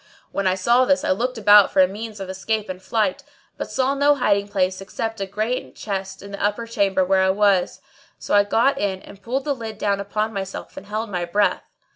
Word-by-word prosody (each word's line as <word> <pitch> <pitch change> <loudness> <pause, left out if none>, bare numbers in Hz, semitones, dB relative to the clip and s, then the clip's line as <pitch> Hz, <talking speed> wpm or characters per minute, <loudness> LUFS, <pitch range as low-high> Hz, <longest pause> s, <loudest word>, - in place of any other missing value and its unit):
When 200 -1 -1
I 185 - +2
saw 235 +7 +3
this 280 +1 +2
I - - +1
looked 245 +6 -1
about 205 -2 +6
for - - +1
a 185 - +7
means 210 +2 -7
of 195 - -5
escape 205 +3 -3
and 185 0 -6
flight, 235 +8 0 0.3
but - - -5
saw 265 +1 +1
no 285 +1 +3
hiding 200 -6 +1
place 190 -2 -1
except 225 +2 -5
a 195 - -2
great 215 +6 -3
chest 195 -2 -5
in 200 - -10
the 200 - -5
upper 210 +3 0
chamber 200 -4 +1
where 190 +1 +3
I 190 - +3
was. 195 -2 +2 0.4
So - - -4
I 205 0 +6
got 235 +7 +2
into 190 -2 -2
it - - -16
and 200 0 -13
pulled 260 +5 -3
the 290 - +1
lid 225 -4 -7
down 200 -1 0
upon 210 +2 -2
myself 195 -1 -6
and 200 - -10
held 215 +1 -4
my 175 -2 -2
breath. 200 +4 +1
205 Hz, 230 wpm, -22 LUFS, 195-225 Hz, 0.4 s, a